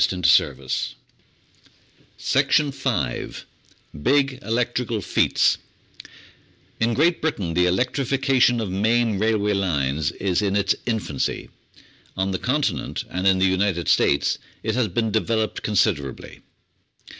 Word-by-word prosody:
Applied 90 Hz, -3 st, -1 dB
Science 70 Hz, -1 st, +2 dB, 1.4 s
807 145 Hz, -2 st, +3 dB, 1.2 s
M 75 Hz, -, -10 dB
Big 135 Hz, -, +2 dB
Electrical 115 Hz, +1 st, -1 dB
Feats 90 Hz, -, +2 dB, 1.2 s
In 115 Hz, +1 st, +1 dB
Great 165 Hz, +6 st, +2 dB
Britain 100 Hz, -, -2 dB
the 90 Hz, +1 st, +3 dB
electrification 130 Hz, +4 st, +1 dB
of 105 Hz, -4 st, -3 dB
main 110 Hz, +2 st, +1 dB
railway 105 Hz, -1 st, +1 dB
lines 75 Hz, -7 st, 0 dB
is 95 Hz, 0 st, -1 dB
in 100 Hz, -1 st, 0 dB
its 100 Hz, -1 st, +2 dB
infancy. 105 Hz, -, -2 dB, 0.7 s
On 95 Hz, +1 st, 0 dB
the 95 Hz, -, -2 dB
Continent 125 Hz, -, -1 dB
and 95 Hz, +2 st, -1 dB
in 95 Hz, -1 st, +4 dB
the 95 Hz, -, +2 dB
United 95 Hz, -2 st, 0 dB
States 70 Hz, 0 st, +2 dB, 0.2 s
it 110 Hz, -, -1 dB
has 120 Hz, -1 st, +1 dB
been 110 Hz, +3 st, -1 dB
developed 110 Hz, 0 st, -1 dB
considerably. 90 Hz, -, -1 dB
105 Hz, 115 wpm, -23 LUFS, 90-120 Hz, 1.4 s, in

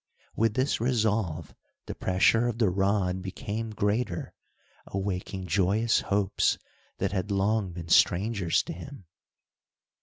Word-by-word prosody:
With 115 Hz, -1 st, +1 dB
this 130 Hz, -2 st, 0 dB
resolve, 105 Hz, -, 0 dB, 0.3 s
the -, -, -5 dB
pressure 105 Hz, +6 st, +2 dB
of 120 Hz, -2 st, -2 dB
the 110 Hz, -6 st, +2 dB
rod 95 Hz, -1 st, +1 dB
became 105 Hz, +4 st, -4 dB
greater, 105 Hz, -3 st, -1 dB, 0.5 s
awaking 95 Hz, -1 st, -3 dB
joyous 100 Hz, +6 st, +2 dB
hopes 100 Hz, -1 st, +1 dB, 0.4 s
that -, -, -1 dB
had 100 Hz, +1 st, -2 dB
long 100 Hz, 0 st, +1 dB
been 85 Hz, -1 st, -8 dB
strangers 95 Hz, +1 st, +3 dB
to -, -, -6 dB
him. 95 Hz, -, -10 dB
100 Hz, 120 wpm, -28 LUFS, 90-110 Hz, 0.5 s, strangers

